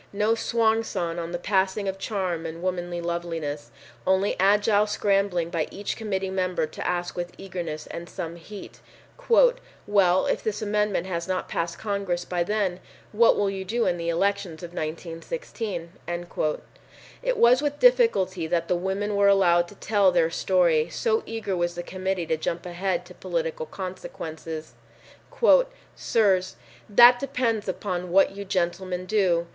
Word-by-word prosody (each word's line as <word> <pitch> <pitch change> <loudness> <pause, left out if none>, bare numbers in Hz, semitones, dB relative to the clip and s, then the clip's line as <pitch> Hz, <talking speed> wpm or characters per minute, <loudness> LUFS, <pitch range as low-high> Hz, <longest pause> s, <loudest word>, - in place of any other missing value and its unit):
No 210 +2 +2
swan 225 0 +1
song 170 -5 -3
on 170 0 -5
the 175 - -2
passing 190 +2 0
of 195 0 -3
charm 185 -5 -2
and 165 +2 -8
womanly 175 -1 -2
loveliness! 165 -4 -4 0.4
Only 190 +1 +2
agile 205 +2 +4
scrambling 195 -5 +1
by 165 -3 -1
each 200 +1 -4
committee 195 -4 -3
member 185 -3 0
to - - -6
ask 175 0 -2
with 175 0 -4
eagerness 170 -5 -5
and 170 +1 -8
some 165 0 -5
heat, 200 +4 -11 0.5
"Well, 205 - +3
if - - -1
this 210 -1 -2
amendment 210 -3 0
has 170 -2 -3
not 185 -1 -2
passed 170 0 -3
Congress 200 -4 -2
by 180 -1 -2
then, 195 -2 -1 0.3
what 230 +2 +4
will 200 -1 +1
you 190 -1 -4
do 230 +5 0
in 175 - +1
the 170 0 -3
elections 185 -1 -1
of 175 0 -8
1916?" 170 - -5 1.3
It - - 0
was 250 - +5
with 290 -1 -1
difficulty 375 - +3
that 170 0 0
the 180 - +3
women 195 +3 -2
were 200 0 +4
allowed 175 -3 +4
to 205 - -14
tell 200 -2 +3
their 165 -2 +2
story, 170 -3 +2
so 450 - 0
eager 225 -4 -3
was 175 -1 -1
the 175 - -4
Committee 185 -1 -2
to 160 - 0
jump 165 +3 -3
ahead 180 +1 -2
to - - -13
political - - -3
consequences. 160 -4 -7 1.2
"Sirs, 190 -5 +1 0.3
that 240 +4 +8
depends 240 -6 -1
upon 180 -2 -3
what 195 +2 +5
you 200 - -5
gentlemen 185 -1 -2
do. 185 -4 +2
190 Hz, 155 wpm, -25 LUFS, 175-210 Hz, 1.3 s, that